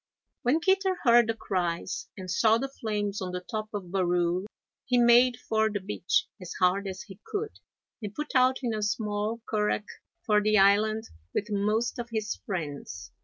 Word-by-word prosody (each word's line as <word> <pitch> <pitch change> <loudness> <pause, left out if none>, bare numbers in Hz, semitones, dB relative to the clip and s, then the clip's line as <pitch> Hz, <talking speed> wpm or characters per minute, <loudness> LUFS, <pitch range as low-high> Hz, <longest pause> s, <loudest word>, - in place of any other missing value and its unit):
When 280 +7 +2
Kitter 380 +1 +2
heard 240 -3 +6
the 225 - 0
cries 180 -4 -2
and 185 -1 -7
saw 220 +3 +4
the 270 +3 -3
flames 205 -2 -2
on 180 -1 -4
the 180 - -2
top 215 -1 -3
of 190 -4 -6
Barrule, 180 0 +1 0.4
he 250 - +2
made 240 0 +6
for 220 0 +2
the 205 -1 -2
beach 190 -1 0 0.2
as 180 - -7
hard 190 +2 +2
as 190 +1 -6
he 200 -3 -13
could, 430 +1 -5 0.4
and 210 -1 -6
put 300 0 -5
out 260 +1 +3
in 235 -2 0
a 215 - -2
small 210 +1 -2
currach 210 -1 0 0.4
for 210 -1 +3
the 215 +1 +3
island, 210 +3 +4 0.3
with 210 +1 -2
most 215 +5 0
of 235 0 -5
his 215 -2 -2
friends. 145 - -5
210 Hz, 175 wpm, -28 LUFS, 195-235 Hz, 0.4 s, heard